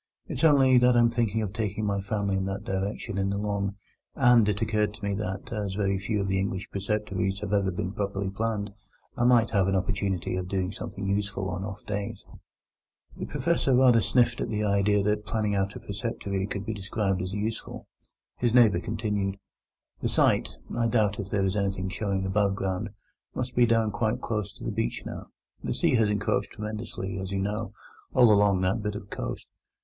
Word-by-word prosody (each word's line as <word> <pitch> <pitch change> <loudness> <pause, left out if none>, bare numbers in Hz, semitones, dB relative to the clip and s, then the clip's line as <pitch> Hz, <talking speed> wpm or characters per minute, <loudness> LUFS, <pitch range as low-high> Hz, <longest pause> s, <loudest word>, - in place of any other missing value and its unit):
It's 130 - -4
only 135 -5 +6
that 125 0 +5
I'm 120 0 +5
thinking 110 -2 0
of 100 -2 -4
taking 105 -1 -2
my 100 -1 0
family 100 -1 -1
in 95 0 0
that 100 +1 -3
direction 100 +1 -3
in 95 0 +1
the 100 - -1
Long, 100 -1 -1 0.4
and 120 -3 +5
it 105 -1 0
occurred 105 -1 0
to 110 - -17
me 100 - 0
that, 95 +1 -4
as 100 -3 -2
very 100 -2 +1
few 105 +2 -1
of 100 - -1
the 95 0 +1
English 95 0 -3
preceptories 100 -1 -1
have 105 -1 -3
ever 100 -2 +2
been 90 0 -3
properly 100 -1 -2
planned, 105 -1 -2 0.4
I 120 - +1
might 120 -2 +5
have 100 -3 +3
an 95 - +1
opportunity 95 -1 -1
of 90 -1 -3
doing 95 -1 -1
something 100 0 -5
useful 100 -1 -1
on 90 +1 -3
off 100 0 -7
days." 100 -1 -4 0.9
The - - -5
Professor 170 -6 +1
rather 125 -3 +6
sniffed 125 +1 +2
at - - -2
the 105 -1 -1
idea 100 0 +3
that 105 0 0
planning 105 -2 0
out 100 0 0
a - - -6
preceptory 100 -2 -3
could 100 -1 -4
be 110 - -2
described 100 -1 -1
as 90 +1 -4
useful. 110 +2 -4 0.5
His 120 -1 +1
neighbour 110 -8 +6
continued: 105 -2 -2 0.6
"The - - 0
site—I 115 -1 +1
doubt 110 -3 +2
if 100 -1 -4
there 100 -1 +1
is 95 +1 0
anything 95 -2 -1
showing 95 -1 -2
above 100 0 +2
ground—must 100 +6 -5
be 120 -1 +5
down 115 -1 +2
quite 110 +1 0
close 105 -4 -2
to - - -12
the - - -2
beach - - -2
now. - - -7 0.4
The - - -2
sea - - +2
has 110 -2 +3
encroached 105 0 0
tremendously, 105 -3 -5
as 95 0 -5
you 100 - -1
know, 105 +2 -2 0.4
all 120 -3 +7
along 100 -2 +4
that 95 +4 +1
bit 105 -1 -3
of 100 -1 -8
coast. - - -4
100 Hz, 195 wpm, -27 LUFS, 95-110 Hz, 0.9 s, all